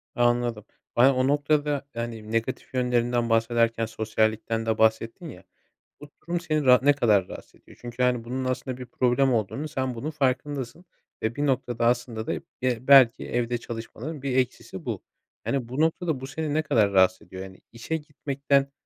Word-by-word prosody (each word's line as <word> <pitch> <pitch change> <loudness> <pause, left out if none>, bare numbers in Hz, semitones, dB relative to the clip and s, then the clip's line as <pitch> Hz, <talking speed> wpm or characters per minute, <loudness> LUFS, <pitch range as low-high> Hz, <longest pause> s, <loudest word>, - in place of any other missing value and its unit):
Anladım. 120 -3 +1 0.3
Ben, 130 +3 +6
o 130 +1 +1
noktada, 145 -1 +1
yani, 115 -2 -5
negatif 115 +3 -2
yönlerinden 120 -1 +1
bahsederken 115 0 +2
sosyallikten 110 0 -1
de 110 -1 0
bahsettin 115 +8 +1
ya. 95 -5 -12 0.6
Bu 150 0 -12
durum 170 0 -2
seni 155 -3 -1
ra 125 -1 +7
ne 145 +1 +6
kadar 105 -9 +2
rahatsız - - -11
ediyor? - - -18
Çünkü, 120 +1 -4
hani, 125 -2 +1
bunun 130 +2 -3
aslında 130 0 -3
bir 125 - -8
problem 125 +2 +2
olduğunun, 115 +7 -2
sen 130 -4 -2
bunun 135 +7 -4
farkındasın 140 +2 -2 0.4
ve, 110 +1 -1
bir 145 0 0
noktada, 120 -3 0
aslında 120 -2 0
da - - -1 0.3
be 125 -2 +1
belki 135 -3 +7
evde 120 0 -1
çalışmaların 120 +6 -7
bir 135 -2 -1
eksisi 125 -2 -2
bu. - - -4 0.4
Yani, 135 -4 -1
bu 130 +5 -3
noktada, 160 -3 0
bu 135 - -6
seni 150 +2 -3
ne 155 - +2
kadar 105 -8 +2
rahatsız 95 -1 +3
ediyor, 95 0 -8
yani, 95 -1 -11
işe 120 +8 -3
gitmekten, 140 -2 -1
125 Hz, 170 wpm, -26 LUFS, 115-140 Hz, 0.6 s, ra